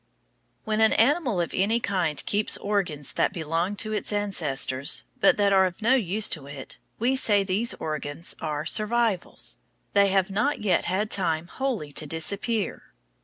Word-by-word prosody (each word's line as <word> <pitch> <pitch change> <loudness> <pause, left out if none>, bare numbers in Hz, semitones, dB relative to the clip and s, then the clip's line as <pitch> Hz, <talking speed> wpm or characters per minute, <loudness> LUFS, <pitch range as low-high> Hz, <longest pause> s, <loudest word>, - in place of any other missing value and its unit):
When 215 0 -1
an 220 - +5
animal 250 - +2
of 170 - -2
any 215 +5 +1
kind 180 -9 -1
keeps 210 +1 +2
organs 185 -9 -2
that - - +1
belonged 165 +4 -2
to 215 0 -4
its 215 - -2
ancestors, 150 -10 +1 0.2
but 195 - +4
that 200 -1 +3
are 190 -1 +5
of 180 - -9
no 240 +4 +4
use 215 -4 +3
to 145 -5 -5
it, 140 -2 -9 0.2
we 250 +4 +1
say 205 -6 +3
these 200 +5 0
organs 155 +1 -3
are 150 -1 -3
"survivals." 215 -3 0 0.4
They 200 0 +5
have 195 0 +1
not 215 +9 0
yet 185 -5 +2
had 200 +4 -1
time 165 -4 0
wholly 225 - -4
to 150 +2 -3
disappear. 200 +8 -2
195 Hz, 165 wpm, -25 LUFS, 165-215 Hz, 0.4 s, an